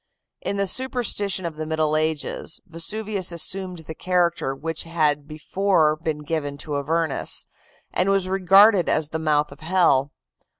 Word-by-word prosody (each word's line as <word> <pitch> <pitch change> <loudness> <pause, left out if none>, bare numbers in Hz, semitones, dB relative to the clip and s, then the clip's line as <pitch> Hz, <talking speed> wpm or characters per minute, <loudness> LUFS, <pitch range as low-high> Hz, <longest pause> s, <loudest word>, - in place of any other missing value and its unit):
In 200 - -2
the 200 - +1
superstition 205 -4 0
of 160 -2 -5
the 155 - -4
Middle 155 -1 0
Ages 155 0 -2
Vesuvius 195 +3 -2
assumed 180 0 -2
the 160 - -6
character 170 -5 0
which 160 +3 -4
had 150 -3 0
before 155 +1 +1
been 155 -1 -4
given 145 -2 -3
to 145 -1 -3
Avernus, 160 +1 -1 0.5
and 185 +2 +2
was 195 -2 +2
regarded 195 +1 +5
as 155 -1 +2
the 160 - -3
mouth 150 -1 +1
of - - -13
hell. 155 -5 +2
165 Hz, 145 wpm, -23 LUFS, 155-190 Hz, 0.5 s, regarded